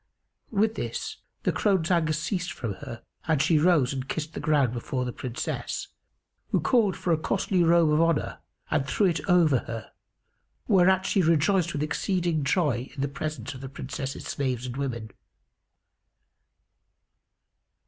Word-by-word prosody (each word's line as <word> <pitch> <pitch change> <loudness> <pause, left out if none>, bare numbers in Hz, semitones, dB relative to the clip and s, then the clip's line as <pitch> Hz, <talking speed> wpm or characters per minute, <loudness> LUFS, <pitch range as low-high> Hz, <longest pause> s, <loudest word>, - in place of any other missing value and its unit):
With 220 +1 +2
this, - - -4 0.3
the - - +2
crone's 190 -5 +1
anger 165 -3 +3
ceased 175 +3 -2
from 115 -5 -4
her 115 0 -8 0.2
and 160 -3 +2
she 155 +1 +4
rose 150 -6 +3
and 130 0 -5
kissed 160 0 -3
the - - -5
ground 145 -5 +2
before 125 +1 -3
the 125 - -3
Princess, 125 -2 -4 0.6
who - - +2
called 225 -7 +2
for 175 - +1
a 160 - +1
costly 185 +2 0
robe 170 -1 +4
of 150 +1 +4
honour 165 -2 +1 0.3
and 140 -3 +1
threw 200 +9 +2
it 170 -4 +1
over 165 -7 +5
her, 115 -2 -6 0.8
whereat 190 -2 +4
she 195 - +2
rejoiced 170 +2 +2
with 145 - -1
exceeding 170 -1 0
joy 140 -6 +1
in 135 - -4
the 140 - +1
presence 145 -2 -5
of 130 - -10
the 135 - -6
Princess's 135 +1 -5
slaves 130 -3 -2
and 125 -1 -5
women. 120 -6 -4
155 Hz, 155 wpm, -27 LUFS, 135-175 Hz, 0.8 s, over